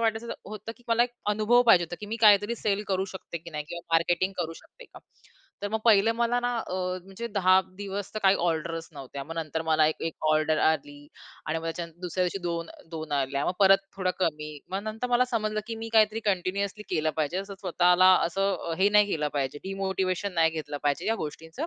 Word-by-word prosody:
वाटायचं 225 +1 -1
होतं 215 +2 -7
की 245 - -24
मला 230 +1 +4
एक 245 - -1 0.2
अनुभव 215 +4 +4
पाहिजे 180 -6 +6
होता 175 +1 -7
की 210 - -6
मी 225 - -3
काहीतरी 205 +2 +6
सेल 205 0 +1
करू 190 0 +1
शकते 170 -2 -7
की 170 +1 -12
नाही 150 -2 -4
किंवा 170 0 -6
मार्केटिंग 175 +3 +2
करू 165 -1 -2
शकते - - -16
का? - - -14 0.6
तर 205 - -1
मग 220 - -1
पहिलं 225 -1 +5
मला 235 +1 +1
ना 245 - 0
अ, 205 - -5 0.3
म्हणजे 195 +5 -7
10 190 -3 +4 0.2
दिवस 200 -1 -5
तर - - -1
काही 195 0 +6
ऑर्डर्स 165 -1 -2
नव्हत्या. 140 -1 -7
मग 165 +3 -7
नंतर 160 -1 -3
मला 155 -1 +3
एक-एक 160 +1 -2 0.2
ऑर्डर 155 0 +2
आली 145 -2 -1 0.4
आणि 160 +1 -1
मग 165 - -9
त्याच्यानंतर 165 0 -5
दुसऱ्या 180 +1 -1
दिवशी 180 +2 -2
दोन 170 -1 -2 0.2
दोन 160 -2 -6
आल्या. 140 0 0
मग - - +1
परत 195 0 +7 0.2
थोडं 185 -1 0
कमी. 155 -3 -1 0.2
मग 195 +2 -2
नंतर 220 +3 -4
मला 245 +1 +4
समजलं 215 -2 -1
की 230 - -4
मी 225 0 -6
काहीतरी 220 0 +4
कंटिन्युअसली 200 +1 -1
केलं 155 -3 +1
पाहिजे 155 +3 -1
असं 195 +1 -6
स्वतःला 180 0 +5 0.2
असं 195 +2 0 0.2
अ, - - -1
हे 195 +2 +5
नाही 210 0 +5
केलं 150 -4 0
पाहिजे 140 0 -2
डिमोटिव्हेशन 190 0 -2
नाही 165 -1 +4
घेतलं 155 -2 -5
पाहिजे 145 -1 0
या 225 - +2
गोष्टींचं 160 - -6
185 Hz, 210 wpm, -27 LUFS, 160-210 Hz, 0.6 s, परत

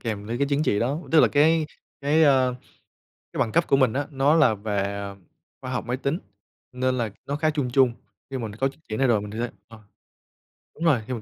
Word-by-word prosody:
kèm 105 -3 -4
với 115 +2 -3
cái 140 - +2
chứng 145 +1 +1
chỉ 105 - +1
đó, 135 +6 0
tức 160 - +7
là - - +5
cái 155 +2 +3 0.3
cái, 150 +3 +3
a, 135 -3 +5 0.9
cái - - -5
bằng 115 - +1
cấp 170 +5 +2
của 135 - +4
mình 130 -5 +3
á, 145 +1 -2
nó 140 +2 +3
là 155 -9 +5
về, 105 0 -3
à, 100 0 -4 0.5
khoa 130 - -6
học 125 - -3
máy 125 +1 -2
tính 140 +5 -2 0.5
nên 130 0 0
là 115 -3 -1 0.2
nó 140 - -2
khá 155 +1 +1
chung 145 -5 -1
chung. 130 -2 +4 0.4
Nhưng 135 -2 -4
mình 110 -2 -4
có 135 - +3
chứng 135 - -11
chỉ 110 - -3
này 135 - +2
rồi 115 -4 +3
mình 105 0 -7
sẽ 120 0 -1 0.2
ờ, 115 -1 -14 1.0
đúng 165 - -4
rồi, 145 -9 +4
khi 130 - -3
mình 115 - -4
130 Hz, 240 wpm, -24 LUFS, 115-145 Hz, 1.0 s, tức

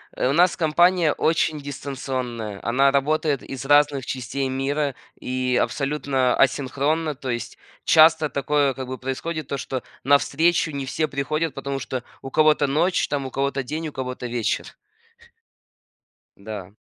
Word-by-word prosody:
Э, - - 0
у - - +1
нас 175 +3 +4
компания 170 0 +3
очень 155 -1 +1
дистанционная, 130 -6 -5
она 135 +4 +3
работает 145 0 +1
из 135 0 -7
разных 145 -2 +4
частей 130 +2 -3
мира, 140 +1 -1 0.2
и 125 0 0
абсолютно 135 -3 0
асинхронна. 145 +3 +1
То 130 0 -7
есть 120 -1 -4 0.3
часто 160 -1 +5
такое, 140 0 +1
как 130 0 -6
бы, 130 0 -5
происходит 140 +4 -4
то, 140 - -3
что 130 -1 -4 0.2
на 140 +2 +6
встречу 165 +3 +1
не 140 -2 -4
все 155 +4 -1
приходят, 155 +2 -2
потому 135 0 -4
что 130 -2 -4 0.2
у 135 - -7
кого-то 155 -1 +4
ночь 165 +7 +1
там, 140 -2 -2
у 130 - -6
кого-то 140 0 -1
день, 155 +5 -4
у - - -6
кого-то 125 -2 -5
вечер. 120 -2 -2 1.6
Да. 100 -2 -8
140 Hz, 150 wpm, -23 LUFS, 130-155 Hz, 1.6 s, на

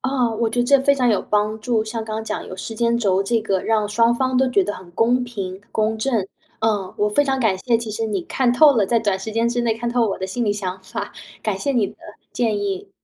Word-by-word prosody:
啊， 260 -3 +1
我 225 +1 0
觉 245 - 0
得 - - +2
这 275 +3 +5
非 280 +1 +4
常 255 -3 +1
有 210 - +2
帮 210 +1 0
助， 220 -1 0
像 220 0 -4
刚 215 -1 -4
刚 220 - -4
讲 - - -4
有 185 - -8
时 225 +4 -6
间 235 +1 +1
轴 195 -4 +2
这 225 +3 +1
个 195 -3 0
让 215 -2 +1
双 230 +3 +3
方 260 +1 0
都 265 0 +3
觉 200 -6 +3
得 205 - -2
很 185 -2 -12
公 240 +6 +2
平、 195 -6 -6
公 220 0 0
正。 220 -4 0 0.3
呃， 210 -4 0
我 210 - +2
非 210 +8 +3
常 270 -1 0
感 220 -7 +2
谢 230 +5 +1
其 230 -2 -5
实 220 +2 -2
你 205 -3 -1
看 250 +6 +1
透 290 +4 +7
了 215 - +4
在 235 - +2
短 205 -4 0
时 190 +3 -6
间 230 +2 +1
之 240 +1 -1
内 230 -2 +1
看 235 +1 -3
透 240 0 +1
了 225 - +2
我 195 - -3
的 190 - -3
心 235 +6 -2
里 205 - +2
想 190 -2 -4
法， 190 - -6 0.3
感 215 -3 -1
谢 280 +8 -1
你 230 -6 +2
的 - - -11 0.4
建 225 -4 0
议。 200 -1 -3
220 Hz, 295 characters per minute, -21 LUFS, 205-240 Hz, 0.4 s, 透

